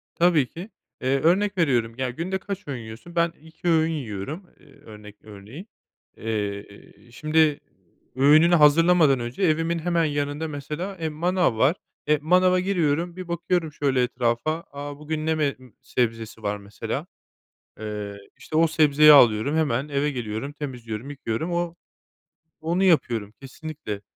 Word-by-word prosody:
Tabii 170 -6 +3
ki, 180 - -9 0.3
eee, 135 +1 +1
örnek 190 +6 +2
veriyorum, 120 -8 +1
ya, 130 -1 -1
günde 170 +9 -3
kaç 200 -3 -7
öğün 130 -3 -3
yiyorsun? 115 +10 -11
Ben 170 0 +2
2 160 +2 -6
öğün 160 -1 +3
yiyorum. 145 - -5
Eee, 145 - -20
örnek 105 -5 -13
örneğin, 110 - -11 0.5
eee, 105 -2 -3 0.5
şimdi 155 +1 +2 0.6
öğününü 155 +6 +6
hazırlamadan 155 -2 +5
önce 120 +9 -5
evimin 165 0 +1
hemen 170 0 +1
yanında, 145 +1 -2
mesela, 155 +6 -5
eee, 160 - -1
manav 175 -4 0
var. 140 +9 +3 0.3
Eee, 150 0 +3
manava 180 +3 +4
giriyorum, 175 -2 0
bir 185 -1 -7
bakıyorum 170 -1 -1
şöyle 135 -3 +1
etrafa. 125 +6 -1
A, 145 0 -7
bugün 155 +1 -4
ne 160 - +2
me 150 -3 0 0.2
sebzesi 115 -2 -3
var, 105 0 -1
mesela, 100 0 -5 0.7
eee, 105 -1 -5 0.2
işte, 155 - -6
o 165 - +5
sebzeyi 150 -2 +6
alıyorum. 125 +2 +5
Hemen 140 -3 0
eve 145 +1 0
geliyorum, 120 +1 -4
temizliyorum, 125 -4 -6
yıkıyorum. 145 +4 -3
O 170 -1 -1 0.9
onu 170 +4 0
yapıyorum 120 - +2
kesinlikle. 135 -6 -7
150 Hz, 140 wpm, -24 LUFS, 120-165 Hz, 0.9 s, öğününü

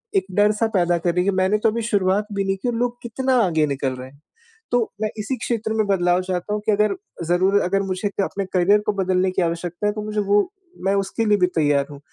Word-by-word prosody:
एक 385 - +2
डर-सा 210 +2 +3
पैदा 175 -1 +3
कर 170 0 0
रही 180 - +2
हैं 200 - +3
कि - - -4
मैंने 190 +3 +2
तो 225 - +5
अभी 230 +2 -2
शुरुआत 205 -1 +1
भी 200 0 0
नहीं 195 0 0
की 225 - -4
और - - -2
लोग 245 +1 -1
कितना 260 +3 -1
आगे 160 -3 +2
निकल 135 -2 -2
रहे 130 +1 -9
हैं। 140 +1 -22 0.5
तो 245 - +3 0.2
मैं 215 - 0
इसी 235 +6 -2
क्षेत्र 220 -2 -2
में 215 -1 +1
बदलाव 180 -2 +2
चाहता 185 +2 -3
हूँ 210 - -2
कि 215 - +3
अगर 210 - +2 0.3
ज़रूर 190 +3 +3
अगर 195 +2 +1
मुझे 190 +2 -2
क 200 - -2
अपने 195 0 -3
करियर 190 +3 +4
को 210 - +2
बदलने 185 -1 +1
की 185 - 0
आवश्यकता 175 +4 -2
है, 210 - +1
तो 215 - -5
मुझे 210 0 -3
वो 205 +1 +3 0.4
मैं 195 - +3
उसके 195 +3 -1
लिए 210 -1 +4
भी 180 -1 +3
तैयार 145 -3 +2
हूँ। 140 - -10
195 Hz, 250 wpm, -22 LUFS, 180-210 Hz, 0.5 s, तो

